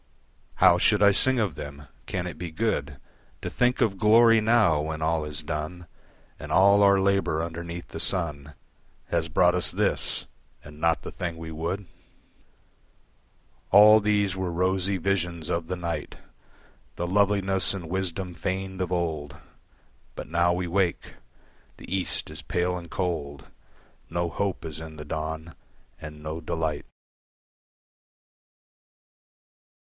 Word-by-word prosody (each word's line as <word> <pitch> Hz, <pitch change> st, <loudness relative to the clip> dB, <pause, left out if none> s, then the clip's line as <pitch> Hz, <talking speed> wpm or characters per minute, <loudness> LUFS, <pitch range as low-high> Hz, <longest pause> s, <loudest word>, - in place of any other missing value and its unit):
How -, -, +5 dB
should -, -, +3 dB
I 100 Hz, -, +7 dB
sing 130 Hz, +6 st, +2 dB
of 105 Hz, -7 st, 0 dB
them? 70 Hz, +1 st, -8 dB, 0.2 s
Can 90 Hz, -1 st, -3 dB
it 90 Hz, -, -7 dB
be 85 Hz, -, -4 dB
good 110 Hz, +8 st, -2 dB, 0.5 s
To -, -, -4 dB
think 125 Hz, +1 st, +1 dB
of 100 Hz, -5 st, +1 dB
glory 115 Hz, +1 st, +6 dB
now, 110 Hz, -9 st, +3 dB
when 80 Hz, +1 st, -4 dB
all 80 Hz, 0 st, 0 dB
is 75 Hz, +1 st, -5 dB
done, 80 Hz, +3 st, -5 dB, 0.5 s
And -, -, -8 dB
all 100 Hz, +2 st, +5 dB
our 100 Hz, -1 st, +5 dB
labour 95 Hz, -5 st, +1 dB
underneath 85 Hz, +1 st, -6 dB
the -, -, -7 dB
sun 75 Hz, -5 st, -2 dB, 0.5 s
Has 80 Hz, -1 st, 0 dB
brought 90 Hz, +3 st, +4 dB
us 90 Hz, -3 st, +2 dB
this -, -, +1 dB, 0.4 s
and 75 Hz, +1 st, -13 dB
not 85 Hz, -1 st, +1 dB
the -, -, -7 dB
thing 85 Hz, -2 st, -5 dB
we 80 Hz, 0 st, -7 dB
would? 85 Hz, +5 st, -3 dB, 1.8 s
All 105 Hz, +2 st, +8 dB
these 105 Hz, -2 st, +1 dB
were 95 Hz, -2 st, -2 dB
rosy 95 Hz, +2 st, 0 dB
visions 85 Hz, -3 st, -2 dB
of 85 Hz, -2 st, -2 dB
the 90 Hz, -, -2 dB
night, 85 Hz, -2 st, -4 dB, 0.8 s
The 85 Hz, -, -3 dB
loveliness 95 Hz, 0 st, +2 dB
and 90 Hz, -4 st, -7 dB
wisdom 95 Hz, 0 st, -2 dB
feigned 95 Hz, +2 st, -4 dB
of 90 Hz, -1 st, -2 dB
old. 80 Hz, -5 st, -2 dB, 0.8 s
But -, -, -6 dB
now 85 Hz, +2 st, +2 dB
we 90 Hz, +1 st, -1 dB
wake. 90 Hz, 0 st, -1 dB, 0.6 s
The 95 Hz, -, -5 dB
East 95 Hz, -, -1 dB
is -, -, -7 dB
pale 90 Hz, +1 st, -1 dB
and 85 Hz, -1 st, -8 dB
cold, 75 Hz, -7 st, -3 dB, 0.6 s
No 85 Hz, 0 st, -1 dB
hope 95 Hz, +3 st, -3 dB
is 80 Hz, -1 st, -6 dB
in 80 Hz, -1 st, -9 dB
the 75 Hz, 0 st, -9 dB
dawn, 80 Hz, +1 st, -5 dB, 0.5 s
and 75 Hz, -1 st, -9 dB
no 80 Hz, +2 st, -5 dB
delight. 80 Hz, -1 st, -3 dB
85 Hz, 140 wpm, -26 LUFS, 80-95 Hz, 1.8 s, All